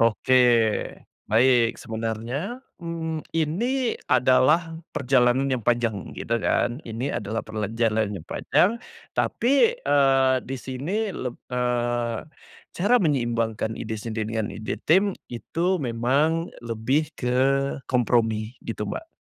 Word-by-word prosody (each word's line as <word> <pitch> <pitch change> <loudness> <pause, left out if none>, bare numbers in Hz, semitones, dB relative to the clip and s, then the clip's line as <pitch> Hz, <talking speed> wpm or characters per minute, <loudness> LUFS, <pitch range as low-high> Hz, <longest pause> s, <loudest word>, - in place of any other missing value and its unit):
Oke 115 +2 +2 0.9
baik 115 +1 +4
sebenarnya, 115 - -4 0.2
mmm, 165 -2 -4
ini 230 - 0
adalah 130 +6 +3 0.2
perjalanan 130 0 +3
yang 125 -4 -1
panjang 120 -5 0
gitu 115 - -1
kan, 120 +3 0
ini 115 +4 -3
adalah 110 +2 -3
perjalanan 110 0 -1
yang - - -23
panjang, 225 +6 +2 0.4
tapi, 280 - +3
eee, 135 - +3
di 135 - -4
sini 150 - -3
leb 125 -8 -4 0.2
eee, 120 -2 0 0.6
cara 205 +7 +3
menyeimbangkan 115 -7 0
ide 110 0 -5
sendiri 110 0 -4
dengan 110 - -2
ide 110 0 -4
tim 190 +4 +4
itu 170 - -1
memang 140 +8 +1 0.2
lebih 120 +6 0
ke 125 0 -1 0.6
kompromi 115 -2 +1
gitu - - -4
Mbak. - - -5
125 Hz, 110 wpm, -24 LUFS, 115-160 Hz, 0.9 s, baik